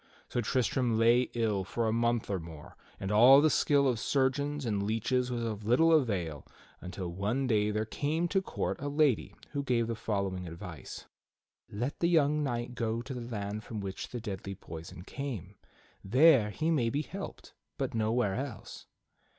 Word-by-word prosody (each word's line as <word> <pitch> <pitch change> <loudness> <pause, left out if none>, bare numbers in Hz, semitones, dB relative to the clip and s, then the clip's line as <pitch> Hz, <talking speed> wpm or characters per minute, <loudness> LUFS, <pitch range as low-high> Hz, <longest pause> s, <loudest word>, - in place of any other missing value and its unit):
So 120 - -1
Tristram 120 0 +1
lay 120 +2 +4
ill 110 -4 +1
for 115 +4 -2
a 110 - +1
month 115 0 +1
or 95 - 0
more, 80 -3 -11 0.2
and 95 +1 -3
all 125 +6 +8
the 155 +1 +4
skill 140 -1 +3
of 120 -4 +1
surgeons 140 +3 0
and 105 -3 0
leeches 115 +4 0
was 120 -1 -2
of 110 -2 -3
little 130 +10 +4
avail 90 - 0 0.4
until 90 0 -5
one 105 +10 -1
day 105 -4 +2
there 105 +1 -1
came 155 +9 -1
to 195 +2 +2
court - - -3
a 145 - -3
lady 140 -9 +1 0.2
who 145 - -2
gave 125 -4 +1
the 115 - -2
following 100 -5 -2
advice: 85 -1 -8 0.6
"Let 120 +8 -3
the 170 - +2
young 150 -3 +3
knight 120 -3 -2
go 115 -1 -2
to 130 +2 -6
the 125 - -5
land 105 -2 -4
from 110 - -6
which 95 -1 -5
the 120 - -5
deadly 100 -3 -5
poison 85 0 -9
came. 130 - -6 0.5
There 125 +1 +5
he 155 +11 -1
may 125 -8 +2
be 145 +5 -1
helped, - - -8 0.2
but - - -2
nowhere 110 -2 +1
else." 130 +1 -6
115 Hz, 175 wpm, -31 LUFS, 105-135 Hz, 0.6 s, all